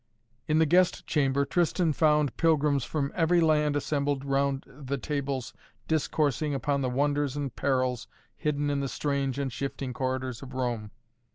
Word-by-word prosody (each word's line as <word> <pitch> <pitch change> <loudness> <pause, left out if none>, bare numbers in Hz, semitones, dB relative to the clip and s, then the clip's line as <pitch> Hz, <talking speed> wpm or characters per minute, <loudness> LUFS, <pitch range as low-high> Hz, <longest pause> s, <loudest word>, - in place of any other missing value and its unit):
In 155 - +2
the 160 - +5
guest 180 +3 +3
chamber 140 -2 +1
Tristan 170 +1 +1
found 150 -2 +2
pilgrims 150 -4 +2
from 140 +1 -2
every 175 0 +3
land 150 -2 +3
assembled 145 -1 -1
round 140 0 0
the 135 0 -5
tables 140 -2 -3 0.3
discoursing 150 -2 0
upon 140 +1 0
the 130 - 0
wonders 145 +1 0
and 140 -4 -3
perils 130 -2 0 0.3
hidden 145 -2 -1
in 140 - 0
the 140 -1 -2
strange 140 -2 -1
and 135 -3 -2
shifting 135 -2 -4
corridors 130 -2 -3
of 135 -1 -9
Rome. 120 -5 -2
140 Hz, 155 wpm, -28 LUFS, 135-150 Hz, 0.3 s, the